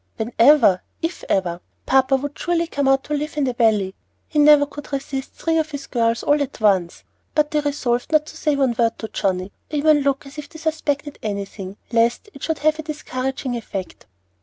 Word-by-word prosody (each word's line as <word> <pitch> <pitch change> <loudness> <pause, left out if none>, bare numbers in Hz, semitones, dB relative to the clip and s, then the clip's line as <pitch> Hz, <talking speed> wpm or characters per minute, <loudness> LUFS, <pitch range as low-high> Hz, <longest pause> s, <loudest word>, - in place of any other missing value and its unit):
whenever! 230 -3 +4 0.2
if 330 +2 -3
ever! 175 -2 0 0.2
Papa 265 0 +4
would 285 +2 -3
surely 340 -1 +1
come 285 -4 -1
out 270 0 +3
and 295 - +1
live 300 +1 -5
in 295 - +2
the 255 -2 0
Valley. 215 -5 +2 0.3
He 300 - -1
never 295 -1 +7
could 290 0 -10
resist 270 -1 -4
three 325 -1 0
of 315 0 -1
his 285 -2 -6
girls 230 -2 0
all 290 0 +3
at 280 -1 -4
once." 190 -5 +1 0.3
But 300 0 +2
they 300 - +2
resolved 275 -4 -1
not 305 -1 +4
to 310 - -11
say 300 -2 0
one 265 -4 +1
word 230 -1 +2
to 220 - -5
Johnnie, 185 0 -1 0.2
or - - -3
even 300 0 +4
look 275 0 0
as 275 +2 -9
if 285 - -8
they 320 - -12
suspected 310 -2 -2
anything, 200 -2 -5
lest 235 - +1
it 275 - -13
should 320 -2 -1
have 310 +1 +1
a - - -1
discouraging 265 -4 -4
effect. 195 - -6
275 Hz, 205 wpm, -21 LUFS, 230-300 Hz, 0.3 s, never